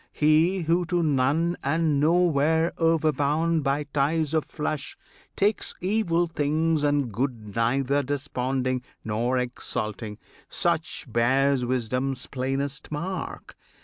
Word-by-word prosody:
He 160 +5 +3
who 170 +2 +2
to 175 0 +1
none 150 +4 +1
and 155 0 +1
nowhere 160 0 +3
overbound 160 0 +2
By 140 +1 0
ties 145 +2 0
of 160 -2 +1
flesh, 150 -2 -4 0.4
takes 205 +2 +1
evil 180 -3 +1
things 155 0 0
and 145 -4 +1
good 115 -4 -3
Neither 135 +5 +1
desponding 130 -2 -2 0.2
nor 115 +4 0
exulting, 110 -3 -4 0.3
such - - 0
Bears 130 +2 +2
wisdom's 125 +2 -1
plainest 135 +2 -3
mark! 170 +4 -5
145 Hz, 110 wpm, -26 LUFS, 130-160 Hz, 0.4 s, He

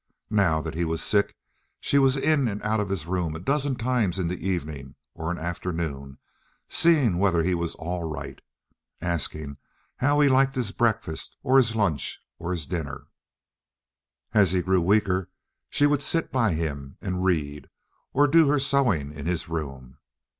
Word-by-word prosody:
Now 90 -7 +3
that - - -5
he 85 +2 -1
was 80 -1 -1
sick, 100 -1 +1 0.4
she 140 - +2
was 135 0 +4
in 140 -2 +2
and 105 -2 -3
out 110 +1 +1
of 105 -2 -2
his 95 -6 -2
room 85 -3 -2
a - - -5
dozen 140 - 0
times 120 -6 0
in 90 -2 -1
an 90 - -4
evening 75 -8 -4 0.2
or 80 0 -4
an 90 - -2
afternoon, 80 -5 -4 0.5
seeing 140 - +3
whether 90 -4 +3
he 90 +2 +1
was 85 -1 -2
"all 85 +1 -4
right," 70 -3 -6 0.6
asking 75 -4 -3 0.4
how 145 +3 +2
he 145 - +5
liked 135 +1 +3
his 120 -6 -1
breakfast, 110 -9 -1
or 130 +1 +4
his 115 -4 +4
lunch, 95 -10 0 0.2
or 85 - -5
his 85 -4 -2
dinner. 80 -3 -5 1.2
As 100 -4 +4
he 90 -1 +1
grew 95 -1 +2
weaker 95 -1 +2 0.4
she 145 - +3
would 145 -1 +2
sit 165 +3 +1
by 115 -7 +2
him 70 -4 -4
and 90 0 -3
read, 75 -6 -1 0.4
or 145 +2 +4
do 160 +1 +5
her 145 +1 +3
sewing 125 - +1
in 70 +1 -7
his 85 -2 -2
room. 70 -6 -6
90 Hz, 170 wpm, -25 LUFS, 80-120 Hz, 1.2 s, he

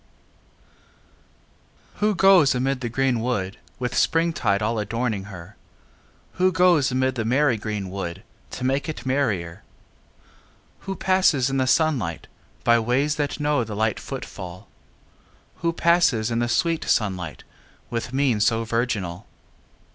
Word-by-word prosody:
VIII - - -33
Who 210 -1 +2
goes 180 -8 +5
amid 130 +1 -1
the 120 - -2
green 130 0 +1
wood 105 -5 -2 0.2
With 125 -1 -3
springtide 165 -12 +1
all 110 +1 0
adorning 110 -1 -2
her? 95 0 -11 0.8
Who 185 0 +5
goes 175 -7 +3
amid 130 +1 +1
the 120 -3 -2
merry 130 +3 +2
green 105 -3 -4
wood 95 0 -5 0.3
To 125 - -7
make 135 +3 0
it 155 - -6
merrier? 105 -11 -1 1.3
Who 195 - -2
passes 185 -10 +2
in 135 - 0
the 130 -1 +1
sunlight 130 - +1 0.4
By 120 0 +4
ways 135 +6 0
that 145 0 -2
know 145 -4 +1
the 110 -2 -6
light 110 +1 0
footfall? 90 0 -8 0.9
Who 170 - 0
passes 165 -10 +2
in 115 - 0
the 120 0 0
sweet 165 +4 +1
sunlight 90 - -1 0.5
With 120 +1 -3
mien 130 -4 +1
so 115 +1 +2
virginal? 105 -6 -2
125 Hz, 135 wpm, -23 LUFS, 105-145 Hz, 1.3 s, goes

